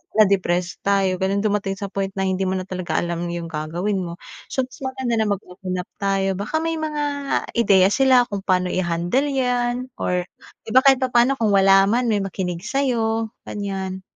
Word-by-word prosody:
na-depressed 185 -4 +2
tayo 195 -2 +1
'ganon 195 +2 0
dumating 205 -2 0
sa 200 -1 -6
point 195 -1 -1
na 195 - -1
hindi 190 0 0
mo 190 - 0
na 185 - -2
talaga 185 -1 -4
alam 170 0 -1
yung 170 -1 -5
gagawin 170 +6 -2
mo. 170 -2 -5 0.3
So, 265 - -1
mas 255 - -11
maganda 260 -3 -2
na 220 - +1
mag-open 185 -2 -4
up 180 -1 -5
tayo. 195 -1 0
Baka 205 +10 -4
may 330 0 -1
mga 305 -1 -2 0.5
ideya 195 -5 +4
sila 260 0 +5
kung 200 - -2
paano 185 -2 0
i-handle 175 +9 0
'yan 250 -2 -1
or 180 0 0 0.4
'di - - -10
ba, 255 - +7
kahit 270 -1 +5
papaano 250 +1 +3
kung 225 -5 +1
wala 195 0 +6
man 235 +5 +1
may 210 -3 +1
makinig 180 -2 -4
sa'yo, 230 -3 0 0.2
gan'yan. 190 -2 -4
195 Hz, 180 wpm, -22 LUFS, 185-240 Hz, 0.5 s, ba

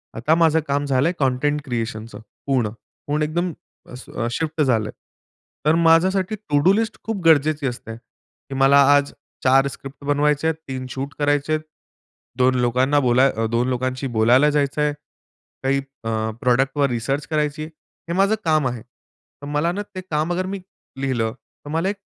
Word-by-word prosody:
आता 150 +8 +2
माझं 160 -1 +4
काम 140 +1 0
झालंय 140 +4 +2
कंटेंट 145 +2 +1
क्रिएशनचं. 115 -2 -4 0.3
पूर्ण 130 -6 +1 0.4
पूर्ण 150 +1 0
एकदम 170 +3 -1 0.3
अ, - - -14 0.2
अ, 115 -2 -1
शिफ्ट 160 +2 -2
झालंय. 110 -6 +1 0.7
तर 155 - +4
माझ्यासाठी 190 +5 +3
टू-डू 145 +7 +4
लिस्ट 220 +1 -1
खूप 220 -4 -3
गरजेची 155 -2 +4
असते. 115 -2 -6
की 135 +2 -15
मला 140 +1 +6
आज 145 0 +1 0.3
4 135 +1 +4
स्क्रिप्ट 135 +1 -10
बनवायच्या 150 +2 +2
आहेत, 160 - -1
3 130 -1 -5
शूट 135 +2 -5
करायचे 145 +1 +1
आहेत. 155 - 0 0.8
2 130 0 +3
लोकांना 130 +4 +2
बोलाय 130 +1 +4
अ, 115 +1 -2
2 120 +2 +1
लोकांशी 130 +1 -2
बोलायला 125 +7 +5
जायचं 145 0 0
आहे. 150 0 +1 0.7
काही 135 +1 +2 0.3
अ, 115 - -3 0.3
प्रॉडक्टवर 135 +3 +2
रिसर्च 130 +5 -2
करायची 150 -1 -1
आहे. 155 - -7 0.4
हे - - -1
माझं 200 +3 +3
काम 155 -4 +3
आहे. 120 -2 -4
तर 130 +3 -17
मला 150 +4 0
ना 205 +3 -3
ते 185 - -4
काम 160 -2 -2
अगर 185 +1 -1
मी 195 +1 -4 0.4
लिहिलं 120 -4 -1 0.3
तर - - -7
मला 165 +4 0
एक 205 - -2
145 Hz, 165 wpm, -22 LUFS, 130-155 Hz, 0.8 s, मला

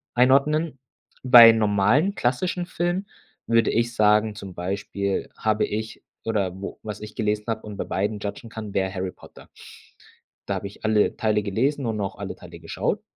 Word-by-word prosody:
einordnen. 140 +4 +3 0.4
Bei 120 -3 +10
normalen 110 - +2
klassischen 175 +9 -1
Filmen 175 +3 -2 0.4
würde 115 -1 +3
ich 120 +1 0
sagen, 105 0 +3
zum 100 -3 -9
Beispiel 100 +2 -3
habe 110 0 +1
ich 110 +1 -5 0.2
oder 100 -4 -1
wo 100 - -7
was 105 -1 -6
ich 105 0 -9
gelesen 105 -1 -1
habe 110 -1 -2
und 105 -2 -9
bei - - -2
beiden 105 +2 -2
judgen 105 +3 -6
kann, 110 -2 -7
wäre 95 -1 0
Harry 95 -1 -3
Potter. - - -16 1.0
Da - - 0
habe 100 - -4
ich 100 - -11
alle 110 -1 +2
Teile 110 -1 +1
gelesen 130 +8 0
und 110 -2 -2
auch 95 - -4
alle - - -6
Teile - - -12
geschaut - - -2
110 Hz, 170 wpm, -24 LUFS, 100-120 Hz, 1.0 s, Bei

